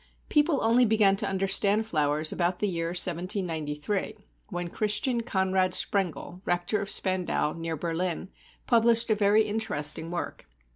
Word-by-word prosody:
People 295 -1 +2
only 230 +3 +4
began 215 -4 +4
to 205 0 -1
understand 195 +2 +2
flowers 155 -4 0
about 175 0 -1
the 210 - -1
year 165 -3 -2
1793, 175 +1 -1 0.3
when 175 -3 -4
Christian 215 +6 0
Conrad 190 -4 +1
Sprengel, 185 -2 -1
Rector 175 +4 -1
of 200 - -5
Spandau, 185 -6 +1
near 165 -1 -4
Berlin, 170 +3 -3 0.4
published 230 -1 +3
a - - +4
very 210 +1 +3
interesting 205 -8 -2
work. 175 0 -5
190 Hz, 135 wpm, -27 LUFS, 170-215 Hz, 0.4 s, only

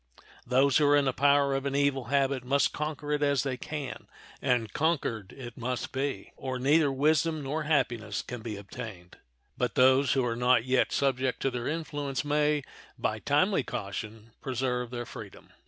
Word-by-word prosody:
Those 135 +1 +4
who 150 -2 +4
are 145 - +5
in 145 - +3
the 130 - +1
power 140 0 +3
of 135 +1 -1
an 140 - -2
evil 140 -2 +1
habit 135 -2 +1
must 140 +3 +2
conquer 150 -1 -4
it 150 0 +1
as 140 -2 +2
they 135 -2 -2
can, 140 0 -6 0.3
and 120 -5 0
conquered 135 - -1
it 120 -4 -9
must 125 +1 -3
be, 135 +1 -3
or 130 -1 -4
neither 145 +3 +3
wisdom 155 +3 +2
nor 150 +3 -2
happiness 120 -8 0
can 125 -2 -7
be 110 -2 -5
obtained; 100 -3 -9 0.4
but - - 0
those 130 +1 +5
who 130 -2 +1
are 115 -1 -1
not 125 0 +3
yet 130 0 +2
subject 130 -2 0
to 135 - +1
their 120 -1 -3
influence 145 -3 -3
may, 150 0 +2 0.3
by - - -1
timely - - +2
caution, 110 +3 -6
preserve 125 -2 -2
their 120 -1 -5
freedom. 105 -4 -11
135 Hz, 175 wpm, -29 LUFS, 125-145 Hz, 0.4 s, are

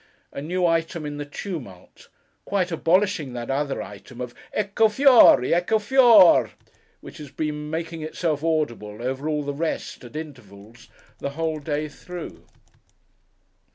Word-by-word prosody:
'—a - - -6
new 180 +4 -1
item 165 -1 0
in 145 0 -5
the 145 - -5
tumult; 145 - -9 0.3
quite 190 -3 -1
abolishing 170 -3 +1
that 120 +1 -5
other 140 0 -2
item 125 -2 -12
of 125 -1 -6 0.2
'Ecco 210 +2 +2
Fióri! 240 - +6
Ecco 180 +6 +2
Fior 260 +5 +3 0.2
r - - +7
r!' - - -17 0.5
which - - -12
has 150 -2 -9
been 150 +1 -4
making 165 +1 -4
itself 155 -1 -2
audible 120 -10 -2
over 135 +4 -3
all 150 -1 -1
the 145 0 -4
rest, 160 -2 -4
at 120 +4 -12
intervals, 120 -7 -10 0.3
the - - -3
whole 160 -1 -2
day 150 +1 -3
through. 175 +3 -10
155 Hz, 150 wpm, -23 LUFS, 140-175 Hz, 0.5 s, r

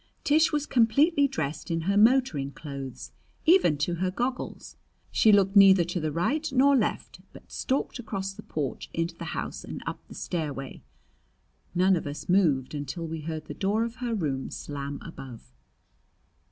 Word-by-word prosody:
Tish 310 +2 +4
was 295 -2 0
completely 280 +6 +3
dressed 155 - -4
in 165 -1 -1
her 195 +5 0
motoring 210 - +3
clothes, 140 -4 -8 0.3
even 330 - +5
to 170 +4 -1
her 185 - +1
goggles. 245 +6 -4 0.4
She 220 - +5
looked 200 -1 +4
neither 195 -3 +8
to 175 +1 -3
the 155 -1 -2
right 285 - -1
nor 275 +2 +5
left, 230 -5 -1
but - - -15
stalked 265 -1 -2
across 195 -4 -4
the - - -10
porch 145 -4 -4
into 165 +1 -1
the 170 - -7
house - - -4
and - - -7
up - - -4
the - - -12
stairway. 145 -6 -4 0.9
None 185 +2 +4
of 160 - -3
us 145 +1 -6
moved 160 -9 +2
until 145 +3 -4
we 160 -1 -5
heard 155 0 -5
the - - -7
door 210 +3 0
of 230 +1 -5
her 240 -2 -2
room 140 -9 -2
slam 140 -1 -6
above. 135 -7 -10
180 Hz, 165 wpm, -27 LUFS, 150-235 Hz, 0.9 s, neither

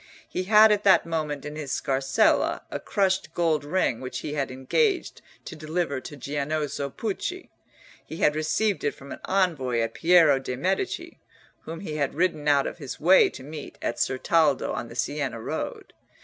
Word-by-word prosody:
He 185 - -3
had 215 +2 +7
at 210 0 +1
that 195 -2 +5
moment 155 -4 -3
in 150 0 -6
his 150 -3 -5
scarsella 135 0 +1
a - - -3
crushed 190 -5 0
gold 160 -4 +1
ring 145 -6 0
which 130 0 -5
he 150 - -5
had 140 -2 -1
engaged 355 - 0 0.2
to - - -7
deliver 155 -3 -2
to 145 - -9
Giannozzo 145 +1 -3
Pucci. 230 - -4 0.5
He 160 - -9
had 150 -2 +2
received 175 +7 0
it 145 - -1
from 140 0 -12
an - - -7
envoy 160 -11 +1
of 115 0 -3
Piero 165 -5 +5
de' 125 -1 -5
Medici, 190 - -2 0.5
whom 165 +2 -7
he 155 -6 -5
had 140 -2 -1
ridden 155 -3 0
out 140 -2 +4
of - - -5
his 140 -4 -7
way 180 +5 +6
to 130 - -11
meet 150 +1 -9
at 120 - -3
Certaldo 145 +2 +1
on 120 - -4
the 115 - -11
Siena 135 -1 -2
road. 110 - -5
150 Hz, 175 wpm, -26 LUFS, 140-180 Hz, 0.5 s, had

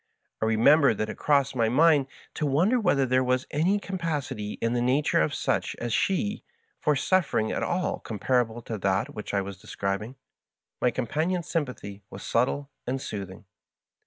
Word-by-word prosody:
I - - +2
re 110 0 +1
member 140 +1 +5
that 110 +1 -2
it - - -6
crossed 140 -2 +2
my 115 -2 +2
mind 145 +1 +4 0.3
to 150 - -1
wonder 180 - +3
whether 145 - +2
there 130 0 +2
was 125 0 +1
any 170 +7 +2
capacity 155 - -3
in 115 +1 -1
the 120 - +1
nature 130 +4 +2
of - - 0
such - - -1
as 120 -1 -3
she 205 - 0 0.4
for 150 -1 +2
suffering 145 - +1
at - - -2
all 180 +1 -1
comparable 120 +1 -1
to 110 -2 -5
that 95 0 0
which 105 - -6
I 100 - +1
was 95 -1 -8
describ 100 0 -2
ing. 115 +5 -8 0.7
My 125 - +4
companion's 155 +8 -1
sympathy 115 -10 -3
was 95 - -9
subtle 135 +4 0 0.2
and 130 +2 -1
soothing. 100 -5 -7
130 Hz, 175 wpm, -27 LUFS, 110-150 Hz, 0.7 s, member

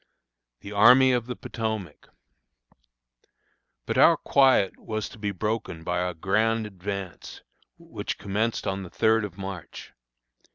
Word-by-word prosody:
THE 100 - -9
ARMY 125 +6 +6
OF 120 -2 0
THE 125 - -4
POTOMAC. 110 -11 -5 1.8
But - - -1
our - - +7
quiet 130 -8 +3
was 110 -1 -4
to - - -14
be 105 -1 -2
broken 105 -4 -3
by 90 +1 -1
our 90 -1 -2
grand 110 +6 +1
advance, 95 -3 -7 0.3
which - - -6
commenced 110 +3 -2
on 95 0 -2
the 90 - -8
3d 110 +1 +2
of 95 -4 -10
March. 95 -4 -8
105 Hz, 130 wpm, -26 LUFS, 95-115 Hz, 1.8 s, our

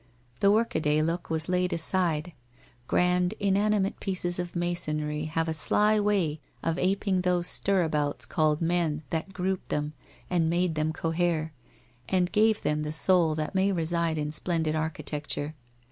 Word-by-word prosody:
The 200 - +4
workaday 160 -9 +2
look 165 +2 -2
was 160 0 0
laid 180 0 +1
aside; 170 -1 0 0.5
grand 180 +1 +2
inanimate 200 0 +1
pieces 180 -2 -1
of 175 0 -4
masonry 155 -3 -2
have 160 +1 -1
a 160 - -1
sly 210 +7 +4
way 195 -7 +1 0.2
of 165 +1 -1
aping 190 0 +1
those 180 -1 +1
stir 195 0 +2
abouts 150 -3 -1
called 155 0 +1
men 165 -3 0
that 165 +4 -2
grouped 185 0 -3
them 150 +1 -2 0.3
and 170 -3 +1
made 175 0 +1
them 155 0 0
cohere, 165 -1 -1 0.6
and 180 -1 +1
gave 215 0 +3
them 150 0 0
the 150 0 -3
soul 165 0 +3
that 155 +3 -3
may 190 +1 +2
reside 170 -2 0
in 150 0 -2
splendid 160 0 -1
architecture. 150 -1 -3
170 Hz, 150 wpm, -27 LUFS, 155-185 Hz, 0.6 s, The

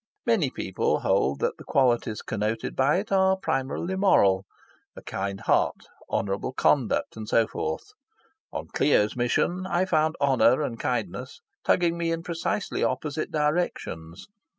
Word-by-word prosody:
Many 220 - +2
people 95 - -1
hold 70 +1 +1
that - - 0
the - - -9
qualities 120 -5 +1
connoted 110 +1 -2
by 140 +5 +3
it 200 +2 -4
are 190 0 +4
primarily 155 +3 -2
moral 100 - +3 0.5
a - - -11
kind 100 0 -4
heart, - - +1 0.2
honourable 100 +6 -2
conduct, 130 -3 +1
and 110 -1 -7
so 115 - +4
forth. 435 -2 -4 0.6
On - - -5
Clio's 105 -8 +3
mission, 175 +10 0
I 185 0 +1
found 155 -3 +1
honour 135 0 +4
and 115 -5 -4
kindness 120 0 -3 0.2
tugging 170 -1 +2
me 165 -1 0
in 165 0 -2
precisely 175 +3 -2
opposite 155 0 -2
directions. 150 - -2
140 Hz, 140 wpm, -26 LUFS, 110-175 Hz, 0.6 s, are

